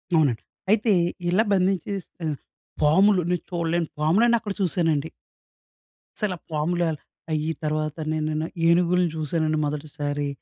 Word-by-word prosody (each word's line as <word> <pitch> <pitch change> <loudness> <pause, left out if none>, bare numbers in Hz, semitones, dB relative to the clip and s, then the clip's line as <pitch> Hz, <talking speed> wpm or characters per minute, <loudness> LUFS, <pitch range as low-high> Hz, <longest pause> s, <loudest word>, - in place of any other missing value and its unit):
అవునండి. 140 -8 +3 0.3
అయితే 220 +1 +3 0.4
ఇలా 190 +5 +4
బంధించేసి 190 0 0 0.7
పాములు 185 +6 +5
నేను 180 -2 0
చూడలేని 170 -1 0
పాములన్ని 225 +10 +4
అక్కడ 210 -3 -4
చూశానండి. 160 -4 +1 1.1
అసల 210 -3 -1
ఆ - - -45
పాముల 165 +3 0 0.5
అయ్యి 155 +1 0
తర్వాత 155 0 -1 0.2
నే-నే 155 -1 -1 0.2
నేన 155 - -1 0.2
ఏనుగుల్ని 175 +1 +3
చూసానండి 155 0 0
మొదటిసారి. 145 -1 -3
165 Hz, 115 wpm, -24 LUFS, 155-185 Hz, 1.1 s, పాములు